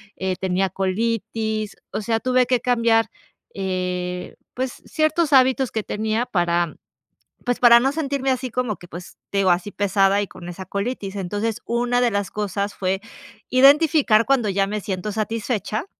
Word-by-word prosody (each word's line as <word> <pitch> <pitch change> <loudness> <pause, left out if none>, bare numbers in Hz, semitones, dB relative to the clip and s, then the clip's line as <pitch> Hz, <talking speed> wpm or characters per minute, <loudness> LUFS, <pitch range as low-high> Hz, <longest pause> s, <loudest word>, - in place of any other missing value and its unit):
eh, 190 -1 -2
tenía 190 0 0
colitis, 215 +2 -2 0.2
o - - -3
sea, 225 +1 0
tuve 255 +1 +2
que 250 -2 +1
cambiar, 230 -2 +3 0.5
eh, 180 -1 -3 0.2
pues 255 0 -4
ciertos 310 0 +1
hábitos 260 -1 +4
que 220 - -2
tenía 220 +3 -1
para 175 -6 0 0.7
pues 245 - 0
para 235 -1 +7
no 265 +2 +2
sentirme 280 -3 -1
así 255 0 -1
como 240 -3 -2
que, 175 - -14
pues 175 +1 -10
te 200 - -1
digo 190 -2 +3
así 175 +3 +1
pesada 200 0 +2
y 205 - -2
con 175 -2 -10
esa 185 +2 -8
colitis, 200 -1 -4
entonces, 205 +3 -3
una 245 +1 0
de 240 - +3
las 200 -2 -2
cosas 205 -1 -3
fue 190 0 -1 0.5
identificar 275 -3 +5
cuando 255 -6 +2
ya 195 0 +1
me 210 +1 -3
siento 195 0 -3
satisfecha 220 - -2
215 Hz, 160 wpm, -22 LUFS, 195-245 Hz, 0.7 s, para